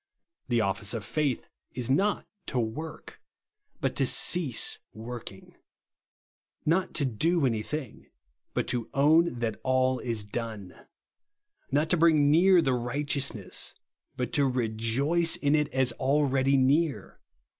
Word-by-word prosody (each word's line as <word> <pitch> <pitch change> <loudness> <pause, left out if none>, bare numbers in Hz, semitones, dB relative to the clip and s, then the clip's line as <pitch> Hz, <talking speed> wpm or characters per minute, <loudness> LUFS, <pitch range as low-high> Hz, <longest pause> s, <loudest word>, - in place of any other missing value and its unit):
The 120 -3 +2
office 100 +2 -1
of 110 -3 -4
faith 145 +1 -1 0.3
is 125 0 -2
not 200 +9 +1 0.2
to 130 - -3
luorh, 125 +8 -4 0.7
but - - -1
to 135 - +2
cease 150 -3 +2 0.2
worhing; 115 -3 -9 1.1
not 170 +4 +1
to 145 - 0
do 155 +6 +1
any 115 -4 0
thing, 140 +1 -6 0.5
but - - 0
to 120 -2 -2
own 155 +1 +4
that 115 -2 -2
all 130 0 +1
is 115 -4 -3
done; 105 -3 -6 1.0
not 145 +3 +1
to 180 - +5
brmg 165 -1 +5
near 165 +5 +5
the 135 - +2
righteousness, 125 -4 -3 0.4
but 125 -2 -3
to 140 -2 +3
rejoice 130 +7 0
in 145 0 +1
it 150 -1 +2
as 130 -2 +1
already 135 0 +2
near. 140 +4 +1
130 Hz, 130 wpm, -28 LUFS, 120-150 Hz, 1.1 s, to